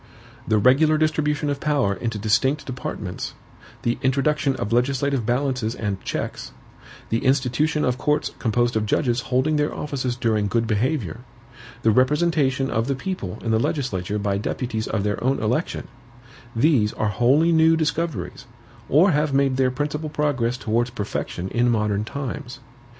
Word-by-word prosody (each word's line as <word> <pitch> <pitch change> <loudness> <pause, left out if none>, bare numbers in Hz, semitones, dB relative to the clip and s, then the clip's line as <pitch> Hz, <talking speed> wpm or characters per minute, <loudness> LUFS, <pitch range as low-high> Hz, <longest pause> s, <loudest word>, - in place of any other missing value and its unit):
The 110 - +3
regular 145 +8 +4
distribution 150 -1 0
of 140 - -3
power 140 -10 +1
into 115 +1 -3
distinct 120 +8 +1
departments; 110 -7 -5 0.5
the 120 +1 0
introduction 140 +1 +1
of 105 -3 -3
legislative 135 0 +1
balances 125 -2 0
and 100 -3 -3
checks; - - -4 0.6
the 115 - 0
institution 140 +3 +1
of 125 0 0
courts 150 0 0
composed 120 0 +1
of 110 -1 0
judges 120 +1 +1
holding 130 +5 +2
their 150 0 +1
offices 130 -4 -3
during 110 -4 +1
good 115 +3 0
behavior; 115 - -1 0.6
the 110 - +5
representation 135 +1 +2
of 115 +2 0
the 140 - 0
people 135 - -4
in 115 - 0
the 110 - +3
legislature 105 - -1
by 100 -1 -1
deputies 110 +1 -3
of 105 -3 -1
their 105 +1 -2
own 135 +2 +1
election: 125 +10 -1 0.7
these 115 -4 +3
are 110 - -1
wholly 135 +10 +3
new 160 0 +5
discoveries, 160 - -2 0.4
or 175 +8 +5
have 150 -2 +1
made 135 -1 +3
their 130 -1 +3
principal 150 +4 -3
progress 145 -5 0
towards 120 +1 0
perfection 100 -4 -4
in 120 +3 +2
modern 105 -3 +1
times. 125 0 -6
130 Hz, 150 wpm, -23 LUFS, 110-150 Hz, 0.7 s, the